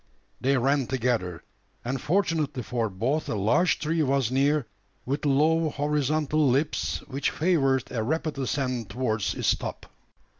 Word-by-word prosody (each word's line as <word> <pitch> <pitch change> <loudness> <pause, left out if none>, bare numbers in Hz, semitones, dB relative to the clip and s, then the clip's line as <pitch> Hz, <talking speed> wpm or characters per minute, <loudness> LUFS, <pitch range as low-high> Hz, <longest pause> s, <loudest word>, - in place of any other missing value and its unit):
They 135 +1 +2
ran 135 +1 +1
together; 115 -10 -1 0.4
and 130 +1 -2
fortunately 160 -7 0
for 115 -1 -1
both 120 +11 -1
a - - -1
large 110 - +2
tree 160 +2 0
was 135 -4 +1
near, 140 +1 +2 0.4
with 140 +3 -1
low 155 +3 +3
horizontal 150 0 +1
limbs, 140 +5 0
which 140 0 -1
favoured 135 -7 +2
a 115 - -1
rapid 155 +4 -2
ascent 130 -4 -2
towards 110 -5 -1
its - - +2
top. - - -6
135 Hz, 140 wpm, -26 LUFS, 125-150 Hz, 0.4 s, low